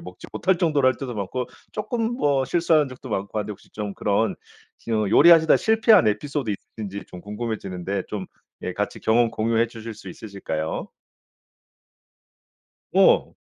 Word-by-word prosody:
먹지 90 0 -11
못할 190 0 +1
정도로 150 -6 +2
할 130 - +4
때도 125 -4 -5
많고 105 +5 -3 0.3
쪼끔 230 +2 -2
뭐 140 - +2
실수한 155 0 +2
적도 130 0 -10
많고 100 -1 -3
한데 105 0 -3
혹시 105 - -10
좀 105 -2 -5
그런 105 +2 0 0.5
음 110 -3 +1
요리하시다 165 +4 +7
실패한 220 - +4
에피소드 135 +3 -2
있으신지 100 0 -6
좀 90 - -10
궁금해지는데 100 -3 -4
좀 100 -3 -5 0.4
예 - - -3
같이 - - -3
경험 115 +1 +3
공유해 115 +1 +1
주실 115 -1 -8
수 95 - -11
있으실까요? 90 -6 -4 2.1
어. - - +4
115 Hz, 315 characters per minute, -24 LUFS, 100-145 Hz, 2.1 s, 요리하시다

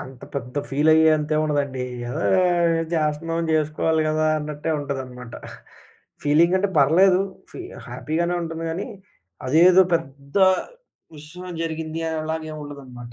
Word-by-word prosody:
అంత 130 -1 -10
పెద్ద 125 -1 -5
ఫీల్ 145 +3 +2
అయ్యే 160 0 +5
అంత 150 0 -4
ఏముండదండి. 145 -4 -1 0.2
ఏదో 120 - -3 0.7
జేస్తున్నాం 165 +1 -1
జేసుకోవాలి 155 +1 +1
గదా! 155 0 +1
అన్నట్టే 150 +1 -4
ఉంటుందనమాట. 130 -4 -6 0.9
ఫీలింగ్ 160 +5 +4
అంటే 200 +2 0
పర్లేదు 180 +7 +5 0.3
ఫీ - - -8 0.3
హ్యాపీగానే 170 +3 -2
ఉంటుంది 165 0 -5
గాని. 170 +4 -4 0.6
అదేదో 175 +7 +6
పెద్ద 140 -3 -5 0.8
విషయం 175 +5 -9
జరిగింది 160 0 -4
అనేలాగా 160 0 -3
ఏముండదనమాట. 135 -5 -9
155 Hz, 115 wpm, -23 LUFS, 140-165 Hz, 0.9 s, అదేదో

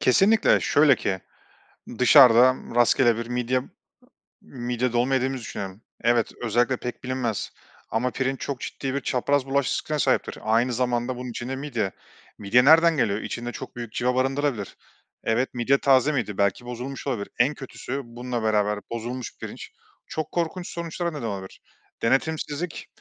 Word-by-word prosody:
Kesinlikle. 200 - +4
Şöyle 145 -3 +4
ki, 95 -1 -2 0.8
dışarıdan 125 -1 +6
rastgele 120 0 +4
bir 115 0 -4
midye 125 +1 0 0.8
midye 125 -1 -3
dolma 120 +3 +1
yediğimizi 130 0 0
düşünelim. 100 -1 -6 0.2
Evet, 120 -1 +2
özellikle 120 +3 +1
pek 125 0 -6
bilinmez 125 -4 -2 0.4
ama 120 +3 0
pirinç 135 +1 -2
çok 135 -3 -3
ciddi 135 -1 -4
bir 140 - 0
çapraz 130 +2 0
bulaş 140 0 +1
riskine 155 -1 -2
sahiptir. - - +1
Aynı 115 +3 +2
zamanda 120 +1 0
bunun 125 0 -6
içinde 120 +3 -4
midye. 125 -8 -2 0.5
Midye 120 +5 +3
nereden 165 +1 +6
geliyor? 105 -5 +1
İçinde 120 0 -5
çok - - -9
büyük 120 -2 -7
cıva 125 +1 0
barındırabilir. 135 -4 -1 0.5
Evet, 120 +4 0
midye 125 +3 +2
taze 135 +1 +4
miydi? 105 -8 -2
Belki 100 +4 +1
bozulmuş 125 +3 -6
olabilir. 115 -7 -2
En 130 +5 +4
kötüsü, 135 -1 -6
bununla 120 0 -5
beraber 105 -1 +1
bozulmuş 120 +1 -5
pirinç - - -8 0.4
çok 155 -1 -4
korkunç 175 +1 -2
sonuçlara 170 0 -3
neden 145 -5 -6
olabilir. 95 -3 -7 0.4
Denetimsizlik 150 +5 -1
125 Hz, 145 wpm, -25 LUFS, 115-135 Hz, 0.8 s, dışarıdan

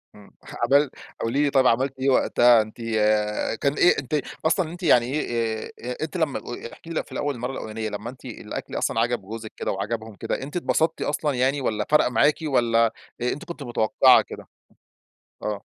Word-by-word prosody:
امم، 105 -1 -16 0.4
عمل 140 -1 +5 0.3
قولي 135 +6 +1
لي 145 - +3
طيب 135 -2 +4
عملتِ 130 +3 +1
إيه 135 +1 +1
وقتها 120 -2 +5
أنتِ 110 +2 -8
آآ 110 -2 +1
كان 140 +4 0
إيه 175 +2 +4
أنتِ 145 +2 -1 0.2
أصلًا 170 +2 +3
إن 155 - -8
أنتِ 180 +1 -10
يعني 120 -7 +5
إيه 115 -5 -2
أ - - -13 0.2
أ - - -5
أنتِ 160 +3 -4
لمّا 160 -4 0
أ - - -15
و - - -7 0.2
احكي 165 - -14
لي 165 - -5
لو - - 0
في - - -21
الأول 145 -1 -2
المَرّة 125 +2 -4
الأوّلانية 110 -3 -5
لمّا 105 +3 -5
أنتِ 125 - -13
الأكل - - -6
أصلًا 115 - 0
عجب 120 0 +1
جوزِك 110 +3 -8
كده - - -2
وعجبهُم 110 +2 -4
كده، - - -3
أنتِ 145 +5 -8
اتبسطتِ 165 -1 0
أصلًا 145 0 0
يعني 130 +3 +1
ولّا 110 -4 -1
فرق 150 - +5
معاكِ 125 +5 +3
ولّا 115 -6 +2 0.3
أنتِ 125 +4 -2
كنت 170 -4 -7
متوقعة 120 -4 +4
كده؟ - - -10 1.0
آه. 105 -1 -3
125 Hz, 200 wpm, -24 LUFS, 110-145 Hz, 1.0 s, عمل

